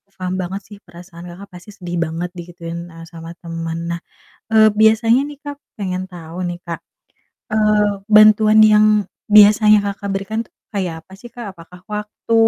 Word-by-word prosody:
paham 185 -1 -4
banget 190 +2 -4
sih 205 0 -14
perasaan 175 -2 -13
Kakak 185 +3 -12
pasti 180 +3 -13
sedih 175 -4 -6
banget 165 +3 -4
digituin, 170 -1 -8 0.2
eee, 165 - -11
sama 165 0 -10
temen. 165 -1 -5
Nah, 170 - -3 0.5
eee, 220 -1 +6
biasanya 220 +3 +4
nih, 290 0 -8
Kak, 290 0 -6 0.2
pengen 185 -2 -3
tahu 170 -1 -10
nih, 175 0 -4
Kak, 170 -1 -4 0.7
eee, 210 -1 +3 0.2
bantuan 215 0 +6
yang 215 0 +5 0.4
biasanya 210 0 +7
Kakak 200 0 -4
berikan 195 +3 -3
tuh - - -30 0.2
kayak 175 -5 -4
apa 190 - -17
sih, 240 +5 -13
Kak? 230 -5 -9
Apakah 175 +1 -15
waktu, 210 +2 -5
195 Hz, 165 wpm, -18 LUFS, 175-215 Hz, 0.7 s, biasanya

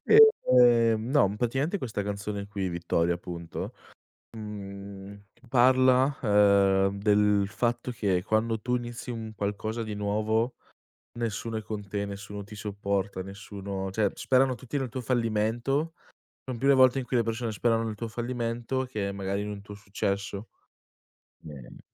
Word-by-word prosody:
ehm, 125 - +6
no 105 -9 +3
praticamente 135 - 0
questa 115 - -3
canzone 100 0 -4
qui, 100 -2 -2
"Vittoria" 85 0 0
appunto, 85 -1 -6 0.6
mhmm, 100 -1 -8 0.3
parla, 130 +2 +4
ehm, 100 -2 +4
del 105 -1 +3
fatto 120 +2 -1
che 100 -7 0
quando 110 +1 0
tu 125 +1 0
inizi 120 0 -6
un 110 -2 -5
qualcosa 105 +3 -3
di 110 -1 -4
nuovo, 110 +4 0 0.6
nessuno 115 0 -2
è - - -3
con 105 -1 -6
te, 100 +1 -3
nessuno 100 0 -7
ti 105 0 -11
supporta, 100 -2 -2
nessuno 100 -1 -6
cioè, 105 0 +1
sperano 130 -1 +2
tutti 130 +5 -5
nel 135 -2 -1
tuo 130 +2 -5
fallimento, 120 +6 0 0.5
son 125 -3 -4
più 135 - +1
le 140 - +7
volte 130 0 +5
in 125 - -3
cui 125 - 0
le 120 - +4
persone 115 +1 -2
sperano 115 +1 +1
nel 110 -1 -3
tuo 115 +2 -5
fallimento 120 +2 -2
che 105 -6 -3
magari 100 0 -2
in 105 - -4
un 100 -1 -6
tuo 105 0 -10
successo. 100 +1 -3 1.0
Ehm 70 -5 -11
110 Hz, 150 wpm, -28 LUFS, 100-120 Hz, 1.0 s, le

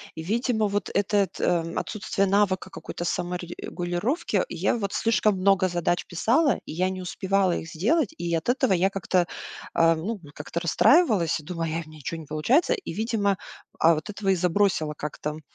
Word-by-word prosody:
И, 160 - -6
видимо, 220 +2 +1
вот 205 -2 -2
этот, 200 -1 +1
ам, 165 -1 0
отсутствие 200 -1 -1
навыка 190 -1 +1
какой-то 175 - -7
саморегулировки, 175 - -2
я 180 +7 0
вот 200 -3 -3
слишком 215 -2 +2
много 190 -1 +4
задач 175 0 0
писала, 240 - +2
и - - -7
я 185 +4 0
не 190 0 -5
успевала 190 0 0
их 165 - -6
сделать. 230 - +1
И 170 0 -2
от 165 +5 -1
этого 260 -2 +2
я 185 +1 +3
как-то, 185 -2 0 0.5
а, 165 0 +4
ну 200 +6 -4
вот 145 - -13
как-то 170 +3 -5
расстраивалась 185 - +3
и - - -20
думала: 165 +1 -3
"Эх, 165 0 -3
у - - -15
меня 155 - -13
ничего 160 +3 -5
не 150 - -12
получается". 230 - +2
И, 390 - -5
видимо, 205 -2 0 0.4
а, 165 +1 +5
вот 155 +7 -6
этого 200 -1 -3
и 190 - +4
забросила 180 -3 +1
как-то, 150 0 -4
м, 155 +1 -9
185 Hz, 185 wpm, -25 LUFS, 170-205 Hz, 0.5 s, а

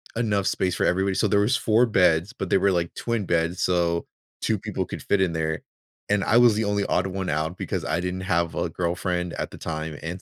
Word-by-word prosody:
enough 105 -4 0
space 90 -2 0
for - - 0
everybody. 95 +1 +1
So - - +2
there 100 - +3
was 110 +6 +2
4 115 +2 +3
beds, 90 -3 +3
but 95 -7 -6
they - - +5
were, 100 +1 +3
like, 85 -2 -1
twin 115 -4 -2
beds, 85 +1 0
so 85 -2 +1 0.3
2 110 -3 0
people 95 -2 -3
could - - -7
fit 100 - +1
in 95 -3 +1
there, 80 -1 -2 0.5
and 105 -1 +2
I 115 - +3
was 120 -2 +6
the 110 +1 0
only 100 -1 0
odd 90 - +1
one 95 -1 -3
out 80 +4 -2
because - - -3
I 85 +2 0
didn't 90 +1 -3
have 85 -3 0
a 85 - -1
girlfriend 90 +1 -2
at - - -4
the - - -11
time, 80 -1 -5
and 85 +3 -5
90 Hz, 235 wpm, -25 LUFS, 85-100 Hz, 0.5 s, was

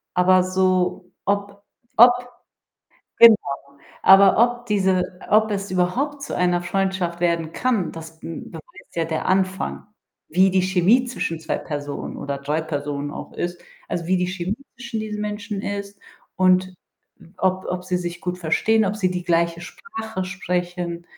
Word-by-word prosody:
Aber 185 0 +5
so 185 -1 0
ob 200 0 -2 0.3
ob 240 +2 +10 1.1
genau, 230 -1 +10 0.7
aber 195 0 +7
ob 240 +1 +2
diese 185 -3 +1
ob 215 +1 +4
es 195 -1 -3
überhaupt 260 +11 0
zu - - -4
einer 175 -1 +2
Freundschaft 185 -1 -1
werden 170 -2 0
kann, 235 -8 0
das, 160 0 -10
hm, 165 - -7
beweist - - -13
ja 165 - 0
der 160 -1 -3
Anfang, 190 +1 0 0.4
wie 185 +4 +4
die 190 - +3
Chemie 185 +7 +3
zwischen 165 -9 -3
2 160 - -2
Personen 145 -2 -5
oder 140 -1 -4
3 150 +3 -1
Personen 145 -2 -4
auch - - -8
ist, 175 0 -4 0.3
also, 170 -1 -3
wie 185 0 +3
die 180 - 0
Chemie 185 +2 -3 0.2
zwischen 235 -2 -5
diesen 210 -1 -4
Menschen 210 -1 -4
ist 200 0 -5 0.4
und 185 0 +3 0.6
ob 185 0 0
ob 180 0 -3
sie 180 -1 0
sich 175 0 -5
gut 180 0 -3
verstehen, 215 +6 +2
ob 205 +2 -1
sie 185 -4 +1
die 180 -1 -3
gleiche 170 -1 +1
Sprache 220 - -6
sprechen. 180 -1 -3
185 Hz, 155 wpm, -22 LUFS, 175-200 Hz, 1.1 s, ob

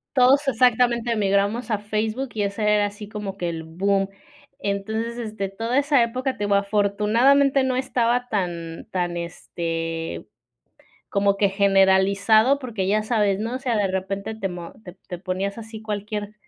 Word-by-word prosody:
Todos 270 +3 +5
exactamente 240 -2 +2
migramos 205 +3 +1
a 215 - +1
Facebook 215 +5 -2
y 215 - -1
ese 200 +2 -3
era 210 -1 +3
así 205 0 -8
como 210 -2 -6
que 175 -3 -2
el 165 -1 -4
boom. 195 +4 0 0.5
Entonces 220 +4 -2
este, 215 -4 -4
toda 225 +6 -3
esa 280 -3 +4
época, 255 +3 -3
te 205 - -3
digo, 205 0 +2
afortunadamente 215 +8 +3
no 260 -1 0
estaba 245 -1 0
tan 170 -6 -3
tan 175 -2 -1
este, 165 -1 -4 0.9
como 200 -1 +2
que 200 0 +3
generalizado, 200 +5 +4
porque, 225 -8 -3
ya 215 +1 +2
sabes, 210 -4 +1
¿no?, 225 +4 -3
o - - -2
sea, 250 -4 0
de 205 -2 +2
repente 195 +3 -3
te 210 -3 -3
mo 175 -2 -8
te 180 -4 -11
te 180 - -6
ponías 190 +3 -3
así 225 -1 -8
cualquier 210 -1 -4
210 Hz, 160 wpm, -23 LUFS, 195-235 Hz, 0.9 s, Todos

